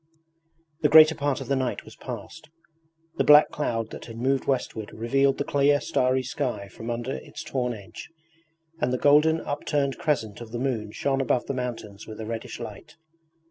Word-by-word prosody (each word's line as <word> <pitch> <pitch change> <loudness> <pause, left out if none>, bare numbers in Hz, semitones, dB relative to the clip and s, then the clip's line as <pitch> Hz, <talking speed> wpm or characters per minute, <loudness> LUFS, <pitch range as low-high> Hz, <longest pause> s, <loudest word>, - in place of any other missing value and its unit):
The 150 - +4
greater 155 +1 +9
part 145 -3 -1
of - - -6
the 140 - +1
night 130 -2 -2
was - - -13
past. 160 - -8 0.7
The - - +3
black 150 +1 +7
cloud 115 -6 -2
that - - -8
had 115 -1 -9
moved 130 +3 0
westward 120 -5 -2
revealed 135 +5 +1
the - - 0
clear 145 0 +3
starry 130 -1 +1
sky 125 -6 -3
from 115 +4 -8
under 120 +2 -3
its - - -7
torn 125 -3 -2
edge, 100 -3 -11 0.7
and 125 - 0
the 125 - +1
golden 150 +4 +4
upturned 145 -1 -1
crescent 115 -9 -1
of 115 -2 -9
the - - -2
moon 120 -5 -2
shone 135 +4 0
above 125 -1 +1
the - - -3
mountains 115 -5 -5
with 110 0 -9
a 110 - -5
reddish 115 +1 -5
light. 110 -4 -9
130 Hz, 180 wpm, -26 LUFS, 115-145 Hz, 0.7 s, greater